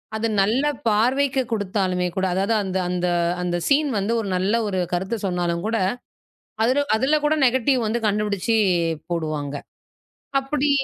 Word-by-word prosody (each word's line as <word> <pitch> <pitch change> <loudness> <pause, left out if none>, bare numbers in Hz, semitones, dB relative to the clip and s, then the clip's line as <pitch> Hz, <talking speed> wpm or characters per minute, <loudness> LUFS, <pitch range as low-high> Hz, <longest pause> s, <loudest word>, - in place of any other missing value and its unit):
அது 225 +1 0
நல்ல 225 +8 +2 0.2
பார்வைக்குக் 255 +4 +2
குடுத்தாலுமே 190 -3 0
கூட, 190 - +1
அதாவது 195 +4 +1
அந்த 190 -1 -2
அந்த 180 0 -1 0.4
அந்த 175 -1 -1
சீன் 290 +1 +3
வந்து 205 +4 -1
ஒரு 205 - -5
நல்ல 190 +4 0
ஒரு 190 -2 -1
கருத்து 190 +6 -1
சொன்னாலும் 175 -1 -1
கூட, 225 0 0 0.9
அதுல 280 +4 +2
அதுல 275 +6 +2
கூட 305 +1 +3
நெகட்டிவ் 260 +1 +2
வந்து 235 +2 -1
கண்டுபிடிச்சு 210 +1 0 0.5
போடுவாங்க. 155 -4 -2 0.8
அப்படி 285 +2 -1
210 Hz, 140 wpm, -22 LUFS, 185-255 Hz, 0.9 s, சீன்